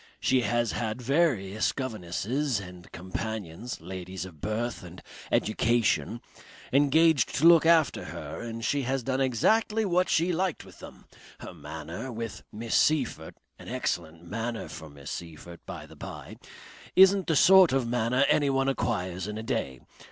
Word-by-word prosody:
She 130 -1 +2
has 120 0 0
had 110 0 -3
various 125 - +1
governesses 120 - -2
and 90 -2 -11
companions, 105 +3 -5
ladies 95 +1 -6
of 80 -5 -13
birth 115 +3 -2
and 90 0 -11 0.3
education, 115 +1 +1 0.5
engaged 145 +1 +4
to 155 - +1
look 165 -1 +7
after 165 -4 +3
her - - -7
and 115 0 -5
she 145 +1 +1
has 135 0 -2
done 130 +1 -1
exactly 215 - +2
what 180 -1 +1
she 170 +3 +2
liked 180 -1 -1
with - - -15
them. - - -12 0.4
Her - - -8
manner 80 - -7
with 115 -2 -6
Miss 115 +1 -5
Seyffert, 130 - +1 0.2
an - - -12
excellent 85 0 -3
manner 115 +6 -4
for 80 - -9
Miss 70 0 -10
Seyffert, 85 +1 -8
by - - -7
the - - -15
bye, - - -9 0.6
isn't 190 0 +6
the 160 - +2
sort 190 +4 +7
of 130 -3 +1
manner 120 +3 +1
anyone 135 -2 +2
acquires 95 -8 -2
in 105 0 -5
a 110 - -5
day. 110 - -3
115 Hz, 150 wpm, -28 LUFS, 95-140 Hz, 0.6 s, look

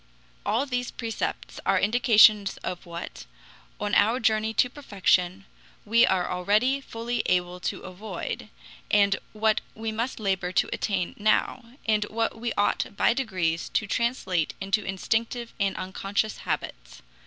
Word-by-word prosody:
All 245 +6 +2
these 250 -2 -2
precepts 225 -2 -4
are - - +3
indications 215 -3 +5
of 180 -1 -5
what, 170 - -7 0.5
on 205 0 -2
our 230 +4 +4
journey 220 -1 +2
to 250 - +4
perfection, 195 -7 0 0.4
we 230 +3 +5
are 185 -2 +1
already 210 +10 +1
fully 235 -1 -3
able 180 0 0
to - - -3
avoid, 185 0 -6 0.4
and 200 -1 +4 0.2
what 215 0 +1
we 220 0 -3
must 230 +4 -3
labor 190 -3 -1
to - - +3
attain 190 -4 -1
now, 230 +3 0
and 215 -2 +2
what 225 +2 -1
we 235 +1 -3
ought 205 0 0
by - - +4
degrees 185 -10 -1
to 220 - +2
translate 195 -6 0
into 195 +2 0
instinctive 225 +5 -2
and 200 -1 0
unconscious 195 +3 -2
habits. - - -5
210 Hz, 140 wpm, -26 LUFS, 190-230 Hz, 0.5 s, indications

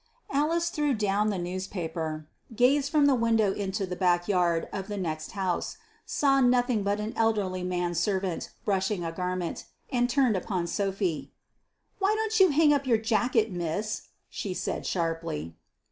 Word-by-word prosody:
Alice 330 +4 +1
threw 295 -3 +1
down 210 0 +1
the 200 - -1
newspaper, 170 -4 -4 0.3
gazed 275 +4 +3
from 300 -2 +4
the 285 - +5
window 225 -4 +2
into 195 0 -2
the 180 -1 -5
back 175 -1 +2
yard 175 -4 +2
of 195 -1 -4
the 205 -1 -4
next 155 -4 -4
house, 190 -3 -2 0.3
saw 275 -2 +3
nothing 245 -2 +3
but 200 +1 0
an 215 +1 -3
elderly 205 -5 +1
man 180 -1 -1
servant 185 0 -1 0.2
brushing 195 -2 0
a 165 - -2
garment, 180 0 -3 0.3
and 245 -2 +2
turned 255 -4 +3
upon 185 -1 -1
Sophy. 190 -3 -2 0.7
"Why 400 +2 +2
don't 440 0 0
you 380 -1 +7
hang 300 0 +5
up 280 -2 0
your 235 -3 +4
jacket, 225 0 +1
miss?" 180 +5 -3 0.2
she 190 -3 -5
said, - - -3
sharply. 165 - -2
200 Hz, 160 wpm, -28 LUFS, 180-245 Hz, 0.7 s, you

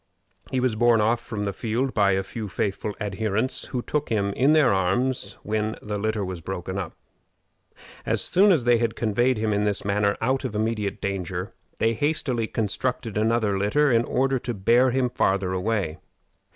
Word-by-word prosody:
He 130 - 0
was 125 -3 +1
borne 120 0 +4
off 110 +2 +2
from 110 -3 -5
the 100 -1 -2
field 120 +5 -1
by 100 -2 +3
a 95 0 0
few 110 +2 -6
faithful 100 +2 -2
adherents, 110 +3 -1
who 125 -2 -4
took 150 -1 -2
him 100 -3 0
in 135 +7 +3
their 150 -9 +5
arms 100 +4 0
when 110 +1 -1
the 105 -1 -4
litter 110 -1 -1
was 90 -2 -6
broken 95 +2 -4
up. 90 -5 -5 1.1
As - - 0
soon 200 +3 +4
as 160 -9 +3
they 120 -1 +4
had 115 -1 0
conveyed 120 +3 +1
him 110 0 0
in 105 0 +1
this 105 -1 -1
manner 100 0 +1
out 130 +4 0
of 125 -5 -4
immediate 105 -2 -1
danger, 95 -1 -3 0.2
they 115 +1 +2
hastily 130 -3 -1
constructed 115 +1 -2
another 110 -2 +1
litter 135 +9 +2
in 115 -1 +4
order 135 +1 +1
to 120 -1 -4
bear 120 +6 +4
him 130 0 +1
farther 95 -5 0
away. 95 -4 -1
110 Hz, 180 wpm, -25 LUFS, 100-125 Hz, 1.1 s, their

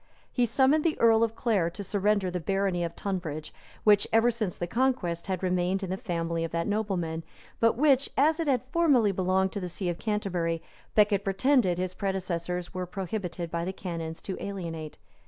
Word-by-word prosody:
He 245 -2 +2
summoned 270 +6 +3
the 325 -2 0
earl 225 -1 +5
of 225 0 0
Clare 210 -9 +1
to 200 +4 -7
surrender 200 -1 +1
the 180 - -2
barony 195 0 0
of 170 0 -4
Tunbridge, 170 -6 -4 0.3
which, 205 -1 +5
ever 225 +2 +4
since 215 -6 -3
the 175 - -2
conquest, 205 -6 0
had 190 -1 -2
remained 185 +1 +1
in 185 - -3
the - - 0
family 170 -6 -2
of 165 - -2
that 170 0 -1
nobleman, 185 -6 -1 0.4
but 230 0 +3
which, 275 -1 +4
as 310 +4 +4
it 330 - -1
had 255 -4 +2
formerly 280 -11 +4
belonged 190 0 +1
to 200 - -3
the 180 -2 -4
see 180 +1 -3
of 175 - -3
Canterbury, 180 -6 -1 0.3
Becket 205 -2 +4
pretended 195 -1 +2
his 185 0 -2
predecessors 180 -2 -3
were 180 -1 -3
prohibited 180 -3 -4
by 170 0 -1
the 185 +2 -3
canons 165 -4 -5
to 190 - -5
alienate. 165 -6 -5
190 Hz, 190 wpm, -28 LUFS, 175-220 Hz, 0.4 s, earl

